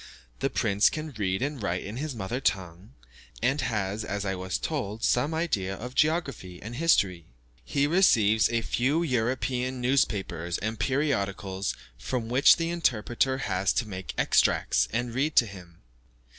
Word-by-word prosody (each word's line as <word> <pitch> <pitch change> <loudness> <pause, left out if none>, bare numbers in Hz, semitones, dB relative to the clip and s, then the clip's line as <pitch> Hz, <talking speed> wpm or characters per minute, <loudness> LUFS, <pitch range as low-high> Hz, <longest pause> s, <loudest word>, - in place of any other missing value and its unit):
The - - 0
prince 105 -1 +3
can 155 0 -5
read 95 0 -1
and 145 -3 -3
write 90 -3 -2
in 105 +4 -6
his 145 -1 -4
mother 115 +4 -3
tongue, 95 -4 -2 0.5
and 135 +4 +2
has, 105 -2 -2
as 100 +1 -3
I 95 - -1
was 95 0 -3
told, 115 -8 -4
some 125 +6 +2
idea 125 - -1
of 125 +5 -7
geography 140 - 0
and 115 +4 -8
history. 95 - +2 0.4
He 140 - 0
receives 110 - +4
a 115 -1 0
few 135 +10 +1
European 125 -1 -1
newspapers 100 -10 0
and 110 +1 -4
periodicals 100 -8 -1 0.2
from 115 - -3
which 130 +3 +6
the 165 0 -2
interpreter 130 -4 0
has 95 -1 +1
to 120 - -1
make 95 -2 -6
extracts, - - +3
and 120 0 -2
read 145 +5 0
to 120 - +6
him. 90 -5 -12
115 Hz, 155 wpm, -27 LUFS, 95-135 Hz, 0.5 s, which